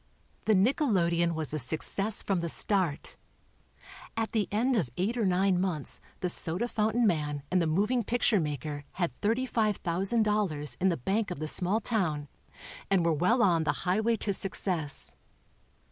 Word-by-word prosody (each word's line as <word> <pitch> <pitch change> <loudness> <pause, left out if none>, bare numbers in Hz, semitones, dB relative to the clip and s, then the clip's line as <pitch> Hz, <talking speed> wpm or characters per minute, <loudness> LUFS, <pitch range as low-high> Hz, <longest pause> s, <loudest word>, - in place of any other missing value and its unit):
The 215 - +4
nickelodeon 185 - +2
was 155 -2 -2
a 155 - -1
success 180 - +1
from 195 -3 0
the 170 0 -3
start. 185 -5 0 1.0
At 225 -1 -1
the 215 -3 0
end 245 +5 +1
of 170 - 0
eight 205 +7 -1
or 225 -5 0
nine 185 0 +2
months 170 -7 -1 0.2
the 180 - 0
soda 175 +5 +2
fountain 220 +1 0
man 150 -6 -1
and 180 -1 +3
the 165 - +1
moving 210 +10 +1
picture 235 -1 +1
maker 145 -1 -4
had 175 -5 -1
$35,000 210 - 0
in 190 - +4
the 170 - -1
bank 200 - -1
of 180 - -5
the 155 +2 -4
small 185 +7 +2
town 160 - -1 0.6
and 190 -4 +2
were 165 - +3
well 185 - +2
on 170 -4 +3
the 145 -2 +1
highway 220 +6 +1
to 200 -1 -2
success. 180 -6 -1
185 Hz, 160 wpm, -29 LUFS, 160-215 Hz, 1.0 s, The